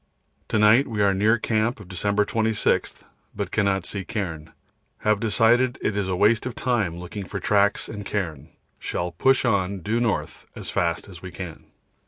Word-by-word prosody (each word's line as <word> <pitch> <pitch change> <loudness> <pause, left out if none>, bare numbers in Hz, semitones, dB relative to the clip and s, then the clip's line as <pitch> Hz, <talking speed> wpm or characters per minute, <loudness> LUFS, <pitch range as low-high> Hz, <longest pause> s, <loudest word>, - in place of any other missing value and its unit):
To - - 0
night 110 +6 +5
we 105 -4 0
are 100 -1 +4
near 105 +4 +3
camp 110 +2 0
of 100 - -11
December 100 +3 0
26, 110 0 0 0.3
but - - -4
cannot 100 -3 +1
see 100 +1 -3
cairn. 85 -7 -5 0.5
Have 110 -1 +2
decided 115 +3 +3
it 105 - -1
is 100 -2 -1
waste 105 +6 +2
of 125 - -6
time 110 -10 0
looking 90 +3 -7
for 100 - -5
tracks 100 +2 +2
and 105 -2 -6
cairn, 90 -8 -3
and 75 +4 -17 0.3
shall 90 0 -3
push 130 +11 +2
on 100 -4 0
due 110 +6 0
north 115 -3 -2
as - - -5
fast 85 +2 -1
as 90 -4 -12
we 95 - -7
can. 90 -3 -8
100 Hz, 180 wpm, -24 LUFS, 95-110 Hz, 0.5 s, night